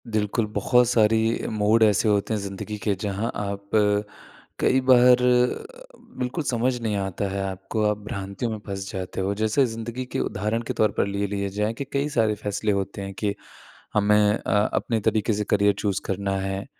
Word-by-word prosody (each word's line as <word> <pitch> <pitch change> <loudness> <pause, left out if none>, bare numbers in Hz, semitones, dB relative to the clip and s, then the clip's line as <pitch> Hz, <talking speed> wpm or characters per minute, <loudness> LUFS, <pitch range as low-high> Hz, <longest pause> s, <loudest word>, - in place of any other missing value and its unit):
बिल्कुल, 110 0 0
बहुत 120 +4 +3
सारी 110 -2 +4 0.3
मोड 110 +1 +3
ऐसे 105 +1 +3
होते 105 +1 +1
हैं 110 - 0
ज़िंदगी 100 +2 -5
के 105 - +2
जहाँ 105 +2 -2
आप 100 -1 -5 0.9
कई 130 - +3
बार 125 0 +7 1.0
बिल्कुल 125 +6 -2
समझ 125 -1 0
नहीं 110 -2 -1
आता 95 0 -2
है 100 +1 -3
आपको 95 +3 -3
आप 105 - -1
भ्रांतियों 100 +3 -4
में 110 - -3
फँस 95 -1 -5
जाते 95 -1 -4
हो 95 +1 0
जैसे 110 +6 +2
ज़िंदगी 115 +2 -5
के - - 0
उदाहरण 105 +4 -1
के - - -1
तौर 110 -2 +2
पर - - +2
ले 100 +1 -1
लिए 100 0 -2
जाए 105 +3 -1
कि 130 - -5
कई 140 +2 0
सारे 110 -6 +1
फैसले 105 +1 -2
होते 100 0 -2
हैं 100 0 -6
कि 105 -2 0 0.6
हमें 105 0 +4 0.2
अ, - - -4 0.2
अपने 115 -2 0
तरीक़े 110 +2 +1
से 105 +1 -1
करियर 100 0 +3
चूज़ 100 -3 -1
करना 100 0 -1
है, 95 +1 -3
105 Hz, 180 wpm, -24 LUFS, 100-115 Hz, 1.0 s, बार